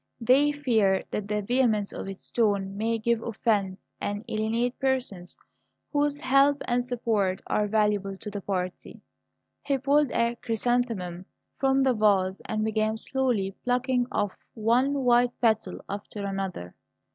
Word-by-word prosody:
They 265 +5 +4
fear 225 -10 +2
that 205 -1 -3
the 210 0 -1
vehemence 220 -3 +1
of - - -6
its 195 -1 -9
tone 200 -4 +1
may 225 +2 0
give 230 +1 0
offence, 205 -4 -1
and 205 +2 -3
alienate 230 +3 -1
persons 255 -10 -2 0.6
whose 290 0 +1
help 275 +2 +4
and 245 0 +1
support 225 -6 0
are 210 - 0
valuable 205 -2 +1
to 210 +1 -8
the 205 0 -5
party." 185 -2 -4 0.6
He 280 -1 0
pulled 285 +1 +2
a 235 0 0
chrysanthemum 225 -7 -1 0.3
from 270 0 +3
the 260 -1 +3
vase 200 -4 +2
and 215 0 -1
began 220 0 0
slowly 230 -6 -1
plucking 250 0 +1
off 205 -2 0 0.2
one 250 +5 +2
white 245 0 +3
petal 220 -5 0
after 200 0 -5
another. 195 - -4
220 Hz, 140 wpm, -27 LUFS, 200-250 Hz, 0.6 s, They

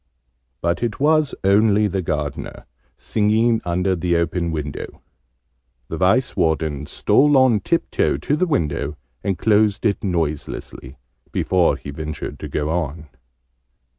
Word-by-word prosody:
But 85 +1 0
it 115 -2 -2
was 155 0 +2
only 105 +2 +4
the 95 -2 -1
Gardener, 75 -3 -4 0.3
singing 110 +2 +1
under 90 +2 0
the 85 0 0
open 85 0 0
window. 75 -3 -5 0.9
The 80 - -4
Vice 95 +9 +2
Warden 80 -3 0
stole 145 0 +3
on 130 -5 +4
tip 165 - -1
toe - - +1
to 145 - -1
the 185 +4 +1
window, 75 - -1 0.3
and 95 -2 -1
closed 105 +3 +2
it 100 -3 +1
noiselessly, 75 -6 -3 0.3
before 90 -6 +2
he 70 +1 -8
ventured 75 +1 -6
to - - -6
go 75 +1 -2
on. 80 -2 -3
90 Hz, 135 wpm, -21 LUFS, 80-110 Hz, 0.9 s, only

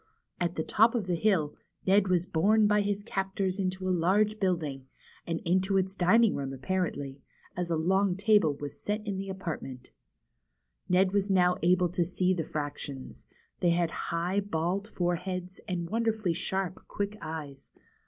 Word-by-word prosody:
At 175 0 -1
the 160 - -1
top 225 +7 +4
of 225 -5 0
the 180 - -1
hill, 170 -5 +2 0.3
Ned 195 +1 +4
was 180 -2 +2
borne 200 +5 +3
by 210 0 +4
his 205 0 -1
captors 195 -2 -2
into 185 0 -2
a 185 - +2
large 205 +5 +2
building, 155 -8 -1 0.4
and 165 -1 -1
into 190 +3 +2
its 190 0 0
dining 205 +5 +4
room 135 -1 -3
apparently, 140 -2 -3 0.3
as 180 -1 -2
a 165 - +1
long 190 +3 +2
table 200 -7 +3
was 145 0 -7
set 210 +1 -2
in 200 -2 -3
the 195 0 -5
apartment. 160 -9 -6 1.0
Ned 185 +1 +4
was 200 0 +1
now 180 -2 +4
able 180 +1 +3
to 175 +1 +1
see 180 +2 +1
the 170 -3 -1
fractions. 145 -3 -6 0.3
They 175 - +3
had 170 -1 +2 0.2
high, 175 +4 0
bald 195 +1 -1
foreheads, 180 -1 -3
and 175 -3 -2
wonderfully 220 -3 0
sharp, 190 +2 -3
quick 205 +1 -3
eyes. 155 -4 -7
185 Hz, 165 wpm, -29 LUFS, 170-200 Hz, 1.0 s, top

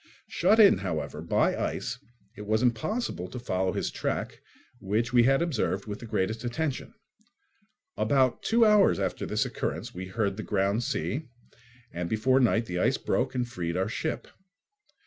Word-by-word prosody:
Shut 220 - +3
in, 205 -3 +7
however, 80 -5 -4
by 85 - +1
ice, - - -3 0.4
it 105 -1 -9
was 110 +2 +1
impossible 120 - -1
to 110 - -8
follow 95 -6 -1
his - - -2
track, - - -3 0.4
which 110 +5 -1
we 120 -1 +6
had 135 +5 +3
observed 120 - -1
with 105 -1 -6
the 120 - -9
greatest 110 +2 -1
attention. 140 - -3 1.0
About 130 -3 +2
two 230 0 +3
hours 210 -2 +5
after - - -2
this - - 0
occurrence - - -4
we 95 +1 -6
heard 100 0 -1
the - - -3
ground 100 +1 0
sea, 145 +3 -3 0.6
and 85 0 -4
before 130 +5 +2
night 115 -2 +2
the 90 -3 -3
ice - - +2
broke - - -1
and 125 -1 0
freed 85 -6 -3
our 95 +1 0
ship. 155 +7 -3
110 Hz, 165 wpm, -28 LUFS, 95-130 Hz, 1.0 s, in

